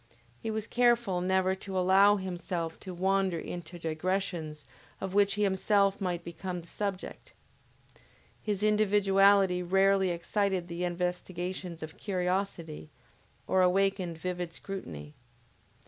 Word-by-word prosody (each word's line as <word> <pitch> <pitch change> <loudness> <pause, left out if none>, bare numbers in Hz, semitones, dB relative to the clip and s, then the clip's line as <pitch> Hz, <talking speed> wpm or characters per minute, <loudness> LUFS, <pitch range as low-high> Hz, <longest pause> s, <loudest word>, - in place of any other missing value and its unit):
He 225 - -3
was 220 -1 -2
careful 235 -7 +2
never 190 +1 +2
to 190 0 -5
allow 190 +3 +6
himself 175 -3 -4
to 190 - -7
wander 190 0 +1
into 175 +1 -7
digressions 165 -2 -2 0.3
of 190 -1 -4
which 200 0 +3
he 210 - +1
himself 200 0 +2
might 180 -2 -2
become 175 +1 -5
the 170 - -17
subject. 200 0 -5 1.1
His 210 -1 -2
individuality 200 -3 +4
rarely 190 +1 +3
excited 185 +1 -1
the 170 +1 -2
investigations 180 0 -3
of 155 0 -8
curiosity, 180 - -2 0.6
or 190 - +2
awakened 185 -2 +2
vivid 175 0 -4
scrutiny. 80 - -7
185 Hz, 115 wpm, -30 LUFS, 175-195 Hz, 1.1 s, allow